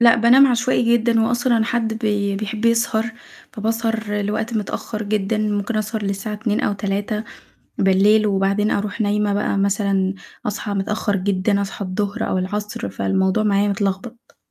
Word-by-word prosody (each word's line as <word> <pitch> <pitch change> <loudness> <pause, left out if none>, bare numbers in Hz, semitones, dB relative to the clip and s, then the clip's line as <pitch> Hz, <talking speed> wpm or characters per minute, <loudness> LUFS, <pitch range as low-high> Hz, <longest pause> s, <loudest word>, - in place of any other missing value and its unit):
لأ 235 -1 +7
بانام 240 +4 +6
عشوائي 245 -1 +2
جدًا، 230 0 +2
وأصلًا 240 +1 +2
أنا 220 - +2
حد 230 -2 -1
بي 205 -3 0
بيحب 215 +2 -4
يسهر، 230 0 +1 0.4
فباسهر 225 -1 -1
لوقت 220 +3 -2
متأخر 215 0 -3
جدًا، 210 0 -1
ممكن 210 +1 -1
أسهر 215 +1 -2
للساعة 200 +2 -3
02:00 215 0 -1
أو - - 0
03:00 205 0 0
وبعدين 200 +1 +1
أرُوح 205 +2 -2
نايمة 210 0 +1
بقى 205 -1 0
مثلًا، 195 -1 +1 0.3
أصحى 210 0 -3
متأخّر 200 +1 -1
جدًا 200 +1 0
أصحى 200 +1 -5
الضهر، 200 +2 -2
أو 185 - 0
العصر، 205 - -3
فالموضوع 190 - 0
معايا 205 -1 +2
متلخبط. 200 +4 -3
210 Hz, 145 wpm, -20 LUFS, 200-225 Hz, 0.4 s, لأ